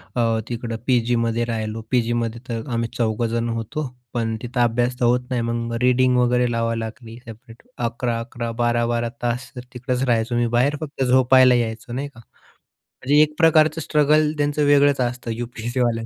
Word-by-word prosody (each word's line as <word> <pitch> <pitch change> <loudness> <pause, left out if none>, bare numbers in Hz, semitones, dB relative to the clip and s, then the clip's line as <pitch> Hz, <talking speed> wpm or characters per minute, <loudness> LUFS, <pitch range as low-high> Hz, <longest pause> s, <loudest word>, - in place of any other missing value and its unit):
अ, 120 - +1 0.3
तिकडं 115 -1 -4
पी 125 -2 +4
जीमध्ये 115 0 +1
राहिलो. 110 0 -3
पीजीमध्ये 120 -1 0
तर 115 +4 -4
आम्ही 115 0 -1
चौघजण 115 +1 -1
होतो, 145 +6 -4 0.3
पण 115 -2 -1
तिथं 125 +1 -4
अभ्यास 120 +2 0
तर 120 - +2
होत 125 +1 +1
नाही, 125 -2 -1
मग 115 0 -3
रीडिंग 125 0 +3
वगैरे 125 0 +2
लावावी 115 0 -1
लागली 115 +1 -8
सेपरेट. 115 0 -14 0.2
11-11, 115 0 -4
12-12 120 0 0
तास 120 +1 -2
तर 125 - -6
तिकडंच 125 +1 -2
राहायचो, 115 0 +1
मी 120 0 +1
बाहेर 140 +4 +2
फक्त 145 -3 -3
झोपायला 130 0 +5
यायचो 115 0 -3
नाही 140 +3 -3
का. 125 -4 -17 0.6
म्हणजे 145 +4 +1
एक 150 0 +2
प्रकारचं 160 -1 +4
स्ट्रगल 150 +1 +2
त्यांचं 145 0 0
वेगळंच 145 -1 +4
असतं 120 -1 -2
यूपीयससीवाल्यांच. 120 0 -2
120 Hz, 160 wpm, -22 LUFS, 115-130 Hz, 0.6 s, झोपायला